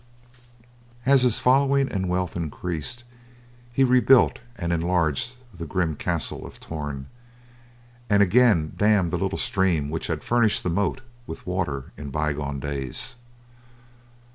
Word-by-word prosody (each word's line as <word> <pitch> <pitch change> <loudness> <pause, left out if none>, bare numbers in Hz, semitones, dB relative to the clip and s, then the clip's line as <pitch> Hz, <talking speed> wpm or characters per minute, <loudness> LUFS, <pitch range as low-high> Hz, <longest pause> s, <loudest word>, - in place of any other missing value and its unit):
As 135 0 +5
his 125 -3 +3
following 135 +1 +3
and 95 -2 -2
wealth 90 0 -1
increased, 85 - -4 0.7
he 135 +3 +2
rebuilt 130 0 +5 0.2
and 85 -5 -2
enlarged 85 - 0 0.2
the 85 -2 -7
grim 85 -5 -1
Castle - - -2
of - - -11
Torn, 75 -4 -6 1.0
and 100 -1 +5
again 100 -6 +3
dammed 105 -5 +3
the 90 - -1
little 95 +1 -1
stream 85 -7 0
which 80 - -3
had - - -3
furnished 120 -3 +2
the 90 - -1
moat 100 +8 0 0.3
with - - -8
water 85 -8 -3
in 75 -1 -7
bygone 75 -1 -2
days. 75 - -2
90 Hz, 130 wpm, -24 LUFS, 75-120 Hz, 1.0 s, As